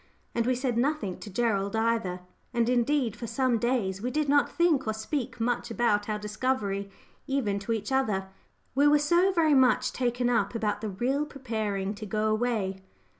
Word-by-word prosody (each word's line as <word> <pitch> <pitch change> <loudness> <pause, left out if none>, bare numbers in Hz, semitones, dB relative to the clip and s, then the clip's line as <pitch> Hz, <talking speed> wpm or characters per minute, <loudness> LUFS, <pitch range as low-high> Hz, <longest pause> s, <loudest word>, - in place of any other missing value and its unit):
And 235 0 0
we 255 - +2
said 245 -2 -1
nothing 270 - -1
to 210 - -8
Gerald 200 -1 0
either; 220 -5 0 0.3
and 235 -1 +2
indeed 250 -1 +1
for 235 - -6
some 240 0 +1
days 215 -6 0
we 245 - -1
did 300 +2 0
not 285 +1 +3
think 330 -7 +2
or 220 - +1
speak 240 +3 -3
much 240 +1 -1
about 220 -3 +1
our 210 - 0
discovery 210 -2 -2 0.4
even 230 -8 0
to 200 +3 -5
each 220 +1 -2
other; 210 -8 0 0.4
we 285 +3 +4
were 295 0 +6
so 345 +6 +3
very 325 -4 +3
much 260 -2 +4
taken 245 -1 0
up 230 -3 +1
about 210 -2 -1
the 215 - -3
real 250 +9 0
preparing 215 -8 -3
to 215 0 -8
go 215 +2 0
away. 215 -4 -1
235 Hz, 180 wpm, -28 LUFS, 210-265 Hz, 0.4 s, were